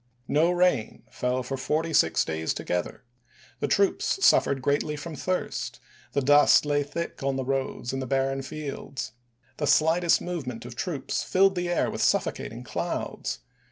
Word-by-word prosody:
No 155 +4 +3
rain 180 -10 +1
fell 125 +1 -1
for 135 +2 -4
forty 155 +5 -1
six 80 - +3
days 80 0 -2
together; 90 +7 -3 0.6
the - - 0
troops 200 - +2
suffered 135 - +4
greatly 145 +2 +1
from 155 +2 -7
thirst; 185 +4 -3 0.3
the 140 - +1
dust 145 +2 +6
lay 145 0 +2
thick 160 +4 -5
on 135 0 0
the 135 -1 -2
roads 135 -2 -2
and 135 - -2
the 130 - -4
barren 135 +1 0
fields. 140 -3 -6 0.5
The 145 - -1
slightest 160 +4 +4
movement 135 -11 -5
of 120 -1 -8
troops 150 +1 -2
filled 195 +1 +3
the 175 -1 -2
air 175 - +1
with - - -4
suffocating - - 0
clouds. - - -3
145 Hz, 155 wpm, -26 LUFS, 130-170 Hz, 0.6 s, dust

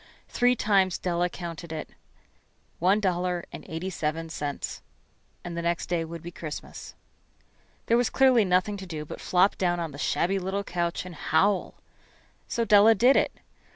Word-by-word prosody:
Three 245 +1 +2
times 195 -5 +2
Della 175 0 0
counted 170 -2 -7
it. 155 -1 -6 0.9
One 190 +5 +3
dollar 180 -3 -1
and - - -8
eighty 165 +4 -4
seven 160 0 -3
cents. 145 -3 -4 0.6
And 175 -1 -6
the 170 - -2
next 170 0 -1
day 175 -2 0
would 165 0 -8
be 175 - -7
Christmas. 155 -3 -8 0.9
There 230 - +3
was 245 -1 +2
clearly 260 -4 +5
nothing 185 +2 +1
to 190 -1 -8
do 155 -3 -5
but - - -8
flop 185 +2 +2
down 175 -2 +1
on 165 -2 -3
the 140 - -10
shabby 195 +5 +1
little 190 +2 -2
couch 175 -2 -2
and 180 - -8
howl. 195 +4 +1 0.7
So 235 - -1
Della 215 +1 +7
did 250 +6 +5
it. - - +3
180 Hz, 165 wpm, -27 LUFS, 170-200 Hz, 0.9 s, Della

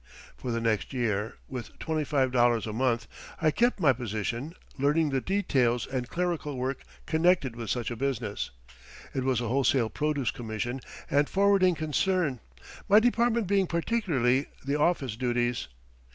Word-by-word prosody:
For 125 - -6
the 115 -1 0
next 115 +1 0
year, 110 -4 -1
with 125 -3 -7
$25 130 -7 +1
a 110 - -4
month, 115 -1 0 0.3
I 155 -1 +3
kept 240 +7 +2
my 145 -7 +5
position, 120 - -4 0.2
learning 150 +2 +2
the 135 -1 0
details 130 -12 +1
and 125 -2 -4
clerical 170 -5 -2
work 130 +1 -2 0.2
connected 160 -6 +2
with 115 -3 -6
such 120 +1 -1
a - - -3
business. 120 -5 -2 0.6
It 130 - -1
was 130 -2 +1
a 120 - -2
wholesale 130 -1 +2
produce 150 -5 0
commission 120 +2 -4 0.3
and 145 +1 +2
forwarding 195 -2 +4
concern, 155 -2 0 0.5
my 205 +2 +8
department 235 0 +2
being 195 0 +2
particularly 160 - +1 0.2
the 140 +1 0
office 145 -8 +1
duties. 120 - 0
135 Hz, 145 wpm, -28 LUFS, 120-165 Hz, 0.6 s, my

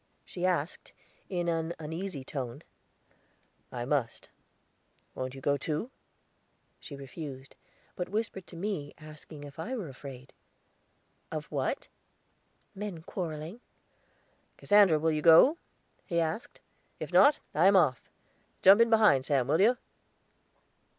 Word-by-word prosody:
she 180 0 -2
asked, 175 -2 -2 0.4
in 175 -2 -2
an 165 0 -1
uneasy 160 -1 -5
tone. 130 -3 -6 1.1
"I 120 -1 -4
must. 130 -4 -2 0.8
Wont 130 0 -5
you 135 - -9
go 145 +1 +1
too?" 155 - -3 0.9
She 145 - -9
refused; 135 -1 -9 0.4
but 180 - -4
whispered 205 -2 -3
to - - -12
me, 170 -5 -4
asking 155 -1 -11
if 145 +1 -11
I 240 +11 -3
were 200 - -5
afraid? 135 -1 -11 1.0
"Of - - -4
what?" - - -2 0.9
"Men 195 -5 -6
quarreling." 170 +3 -6 1.0
"Cassandra, 205 -6 +5
will 160 +1 +1
you 155 -1 -1
go?" 170 - +7 0.5
he 170 - 0
asked. 165 +7 -3 0.4
"If - - -6
not, 290 +1 +6 0.2
I 170 +5 +4
am 200 - +5
off. 150 -10 +2 0.5
Jump 195 +4 +8
in 230 - +5
behind, 210 - +4
Sam, 135 -4 +2
will 155 +5 +2
you?" 240 +5 +4
160 Hz, 125 wpm, -30 LUFS, 145-195 Hz, 1.1 s, Jump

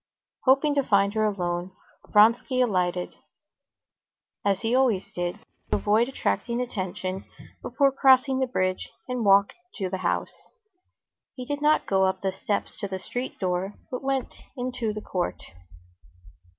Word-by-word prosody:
Hoping 275 +3 +4
to 280 -1 +2
find 200 -3 +3
her 215 0 +1
alone, 180 -3 -2 0.4
Vronsky 230 +5 +4
alighted, 180 -7 0 1.3
as 200 +1 +1
he 225 +1 0
always 250 -7 +2
did, 175 0 -2 0.3
to - - +2
avoid 220 +4 +2
attracting 235 - -1
attention, 190 -5 -4 0.4
before 275 -1 +2
crossing 265 0 +4
the 260 - +1
bridge, 185 -6 -1 0.2
and 250 -2 -2
walked 200 0 +5 0.2
to 190 -4 -3
the 190 - -1
house. 175 - -1 1.0
He 255 - -6
did 290 +2 -3
not 300 +1 +3
go 190 -1 +2
up 190 0 -2
the 190 - +1
steps 200 +2 -3
to 200 - -3
the 190 -1 -4
street 245 +7 -5
door, 185 +1 -2 0.2
but 250 - -3
went 270 -2 -1 0.2
into 245 -3 -2
the 210 0 -6
court. 180 -4 -3
210 Hz, 145 wpm, -26 LUFS, 190-255 Hz, 1.3 s, walked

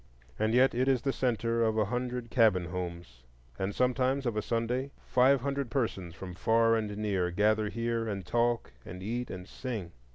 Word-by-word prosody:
And 110 +2 +2
yet 130 +2 +5
it 125 +2 +1
is 130 -3 +2
the 135 - 0
centre 115 -2 0
of 110 -1 +1
a 110 - +3
hundred 125 +1 -3
cabin 110 -7 +4
homes; 85 -7 -6 0.4
and 95 +1 -2
sometimes, 130 +2 +1
of 120 -3 0
a 105 - 0
Sunday, 120 +5 -1 0.2
five 130 +1 +4
hundred 140 -1 -2
persons 95 -10 -2
from 95 -2 -7
far 115 +4 +3
and 105 -2 -2
near 100 -4 0
gather 105 +3 +2
here 115 0 -1
and 100 -4 -4
talk 120 - +1
and 90 +2 -8
eat 120 +4 -3
and 90 0 -7
sing. 110 -10 -5
115 Hz, 185 wpm, -30 LUFS, 100-125 Hz, 0.4 s, yet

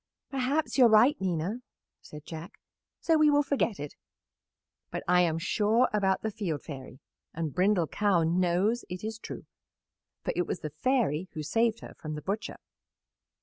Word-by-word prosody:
"Perhaps 275 +3 0
you 250 - +9
are - - +6
right, 230 +6 +6
Nina," 180 +3 -1 0.4
said 150 0 -11
Jack, 165 +5 -8 0.5
"so 325 -2 +3
we 305 -1 +6
will 290 0 +4
forget 265 - 0
it, 145 0 -6 1.0
but - - -5
I 180 0 +5
am 165 -2 +1
sure 210 +7 +2
about 195 -2 +1
the 220 - -1
Field 190 -9 -3
Fairy, 135 -3 -9 0.4
and 160 -3 -3
Brindle 185 -2 +3
Cow 195 0 +1
knows 180 +7 +1
it 180 +2 -6
is 220 0 -4
true, - - -8 0.8
for - - -1
it 175 - 0
was 170 - -3
the 155 - -5
Fairy 185 - 0
who 155 -2 -4
saved 225 +8 +1
her - - -10
from 155 -1 -5
the 150 - -6
butcher." 205 +3 -3
190 Hz, 170 wpm, -29 LUFS, 165-225 Hz, 1.0 s, you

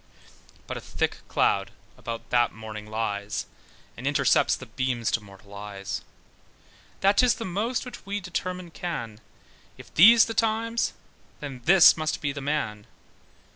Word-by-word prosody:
But - - -5
a - - -7
thick - - -2
cloud - - +1 0.3
about 115 -1 -7
that 120 -2 +3
morning 110 -1 -8
lies, 105 -2 -2 0.5
And - - -5
intercepts - - +3
the - - -9
beams 125 -3 -1
of 115 - -4
mortal 100 0 -15
eyes, 100 -1 -6 1.0
That 200 +1 +4
'tis 250 -2 +5
the 230 - -6
most 215 +9 -2
which 250 - -9
we 200 +1 -3
determine 180 -1 -4
can, 115 - -5 0.6
If - - -14
these 225 +7 +8
the 225 - -4
times, 230 +1 0 0.5
then 135 -4 -7
this 180 -2 +8
must 155 0 -1
be 145 - -1
the 145 +1 -6
man. 135 -8 -2
145 Hz, 145 wpm, -26 LUFS, -, 1.0 s, these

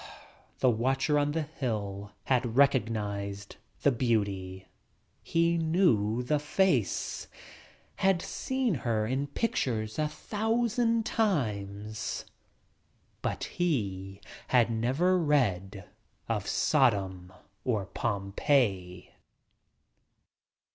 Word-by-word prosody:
The 130 - +5
watcher 135 +6 +1
on 145 0 0
the 160 0 0
hill 105 -9 -4
had 125 -3 0
recognized 105 -7 +1 0.3
the 140 - +5
beauty 100 -6 -1 0.3
— - - -42
he 170 0 +1
knew 125 - +2
the 150 +4 +1
face. 150 - 0 0.7
Had 190 -2 +3
seen 260 +4 -1
her 110 -3 0
in 135 +5 -1
pictures 120 - -1
a 155 - +2
thousand 225 +6 0
times! 105 - -2 1.0
But - - -2
he 100 - -2 0.3
had 120 -2 +3
never 135 +12 +2
read 100 - 0 0.4
of 105 -4 -2
Sodom 95 - +1 0.3
or 110 -6 0
Pompeii 100 -2 0
120 Hz, 90 wpm, -29 LUFS, 100-155 Hz, 1.0 s, The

